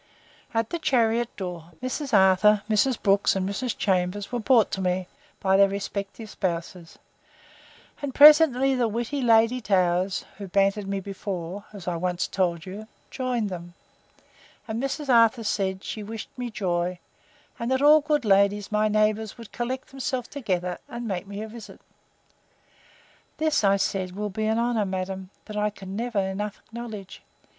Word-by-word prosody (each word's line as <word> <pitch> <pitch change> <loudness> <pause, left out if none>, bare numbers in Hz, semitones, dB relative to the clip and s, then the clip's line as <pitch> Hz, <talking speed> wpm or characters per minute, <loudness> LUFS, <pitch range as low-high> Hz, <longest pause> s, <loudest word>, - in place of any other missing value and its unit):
At 225 -1 -1
the 340 - -2
chariot 235 -4 +2
door, 175 -3 -6
Mrs. 255 +2 -4
Arthur, 200 +1 +5
Mrs. 225 +3 +2
Brooks, 200 0 +3
and 190 -1 -1
Mrs. 220 +4 -3
Chambers, 190 +1 0
were 245 - -1
brought 230 -1 +4
to 190 - -2
me, 180 0 -1 0.3
by 190 0 +2
their 200 0 +6
respective 200 +2 -5
spouses; 170 -3 -4 1.0
and 285 -2 -3
presently 285 -3 +7
the 250 -3 +1
witty 235 +6 -2
Lady 230 +1 +4
Towers, 185 -2 +1
who 200 - -6
bantered 195 +2 +1
me 195 0 -2
before, 195 -1 -5
(as 200 -4 -10
I 175 -1 -1
once 180 +1 -1
told 175 -3 -1
you,) 205 +3 -8 0.2
joined 250 -5 -1
them; 175 -1 -8 0.9
and 225 +1 -3
Mrs. 275 +2 -3
Arthur 230 -1 +4
said, 195 -3 -1
she 215 - -5
wished 220 +1 -7
me 245 -1 -4
joy; 180 -4 -1 0.6
and 235 - -2
that 260 +1 +1
all 300 +1 +7
the 290 - -24
good 295 -5 +1
ladies, 200 0 +3
my 210 0 +2
neighbours, 215 0 +1
would 230 -3 -11
collect 250 +2 -4
themselves 260 -2 -3
together, 180 -10 -2
and 235 0 -5
make 195 -1 -3
me 200 +1 -6
a - - -6
visit. 225 +1 -11 1.6
This, 315 -1 +1
said 195 -2 +1
I, - - -13
will 210 0 -3
be 215 +2 -2
an 220 +1 +1
honour, 235 -2 +1
madam, 190 0 -4 0.2
that 210 - -8
I 210 0 +1
can 195 -2 -9
never 235 0 -3
enough 200 +2 -2
acknowledge. 220 -4 -8
210 Hz, 165 wpm, -25 LUFS, 190-235 Hz, 1.6 s, presently